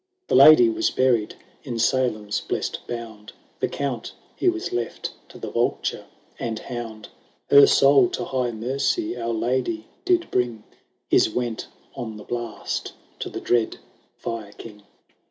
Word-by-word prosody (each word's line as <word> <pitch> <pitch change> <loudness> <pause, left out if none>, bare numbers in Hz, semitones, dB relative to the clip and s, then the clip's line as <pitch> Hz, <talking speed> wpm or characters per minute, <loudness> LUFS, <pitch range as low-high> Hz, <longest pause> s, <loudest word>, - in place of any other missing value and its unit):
The - - +2
Lady 135 -2 +9
was 115 - +1
buried 120 -5 +1 0.3
in 125 -5 -4
Salem's 115 -3 +1
blessed - - -3
bound, 110 -3 -7 0.3
The - - +1
Count 135 -5 -4 0.2
he 365 - +2
was 345 -1 -3
left 120 -1 -3 0.2
to - - -12
the - - -6
vulture - - -1 0.3
and 115 -1 -3
hound: 115 -2 -7 0.4
Her 140 0 +9
soul 135 -2 +5
to 120 - -3
high 130 -2 -1
mercy 120 0 -1
our 115 -1 -3
Lady 130 - -1 0.2
did 360 -1 +1
bring; 120 -3 0 0.5
His - - +5
went 120 -1 -3 0.3
on 110 -5 -6
the 105 - -10
blast 120 -2 -4 0.3
to - - -4
the - - -6
dread 120 -2 +1 0.4
Fire 110 -3 -5
King. 105 -2 -11
120 Hz, 145 wpm, -24 LUFS, 110-130 Hz, 0.5 s, Lady